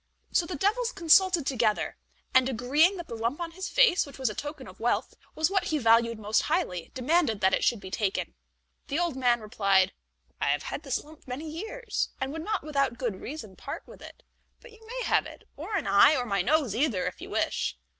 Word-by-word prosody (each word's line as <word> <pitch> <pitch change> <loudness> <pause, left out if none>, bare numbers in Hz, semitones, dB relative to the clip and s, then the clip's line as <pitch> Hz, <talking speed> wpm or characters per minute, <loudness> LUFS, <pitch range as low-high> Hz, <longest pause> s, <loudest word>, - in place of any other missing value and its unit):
So 340 - +2
the 365 - -4
devils 445 - +1
consulted 350 -2 +4
together, 230 -6 0 0.4
and, 260 0 +5
agreeing 290 - +3
that 345 - -7
the - - -7
lump 230 +6 -2
on 340 -1 -4
his 375 +3 -5
face, 470 -7 +4
which 280 - -11
was 260 -5 0
a - - -6
token 290 0 -6
of 185 - -13
wealth, 235 +2 0 0.2
was 315 +3 +1
what 390 -1 +1
he 315 - 0
valued 230 -2 +4
most 210 0 +1
highly, 180 -2 -1
demanded 260 - +1
that 190 -1 +3
it - - +2
should 235 - +2
be 190 -1 -10
taken. 195 - -1 0.5
The 280 - -2
old 345 -4 0
man 245 -3 +2
replied: 195 -3 +2 0.5
"I - - +1
have - - +1
had - - -5
this - - -2
lump 305 -1 -17
many 265 +6 -5
years, 445 +10 -3
and 265 +1 -3
would 320 0 -5
not 425 +1 -2
without 275 -5 0
good 235 -7 -3
reason 225 -9 -7
part - - -7
with - - -14
it; - - -12 0.4
but - - -15
you 440 0 -18
may - - -4
have - - +2
it, - - -14
or 435 - -5
an 365 - -1
eye, 200 +10 +6
or 250 -3 -1
my 200 -4 0
nose 275 - +1
either 235 -8 +1
if - - -5
you - - -8
wish." 65 - -1
275 Hz, 220 wpm, -28 LUFS, 225-340 Hz, 0.5 s, eye